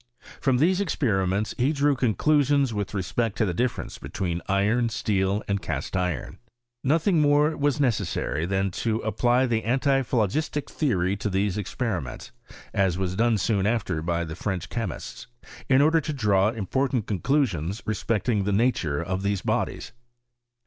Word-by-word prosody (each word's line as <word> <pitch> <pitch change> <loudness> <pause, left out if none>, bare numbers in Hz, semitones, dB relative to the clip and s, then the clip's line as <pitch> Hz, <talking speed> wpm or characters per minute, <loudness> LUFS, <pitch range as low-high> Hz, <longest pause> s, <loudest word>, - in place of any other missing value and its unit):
From 130 -2 +2
these 180 +8 +3
experiments 105 - 0
he 130 +4 +3
drew 145 -1 +2
conclusions 140 +2 +2
with 105 0 -3
respect 105 +3 -1
to 110 - +2
the 90 - -1
difference 120 +6 -2
between 85 -2 -3
iron, 110 +5 +2
steel, 100 -2 0
and 100 0 -1
cast 80 +3 -4
iron. 90 -6 -2 0.4
Nothing 165 +4 +3
more 150 +1 +3
was 145 0 0
necessary 105 - 0
than 95 0 0
to 110 +4 -1
apply 120 +4 +2
the 115 -3 0
antiphlogistic 135 +2 0
theory 100 - 0
to 105 +1 -2
these 100 0 0
experiments, 100 - -4 0.4
(as 95 -3 +1
was 95 -1 -2
done 115 +1 +2
soon 100 -1 +1
after 110 -8 -1
by 85 +1 -1
the 80 -1 -6
French 90 -2 -3
chemists,) 90 - -5 0.4
in 135 +1 +5
order 160 +2 +4
to 155 - -4
draw 105 -6 +2
important 120 +2 -1
conclusions 100 - 0
respecting 110 0 0
the 100 - -1
nature 95 - +1
of 95 +2 -2
these 100 -1 -1
bodies. - - -2
110 Hz, 150 wpm, -25 LUFS, 95-130 Hz, 0.4 s, in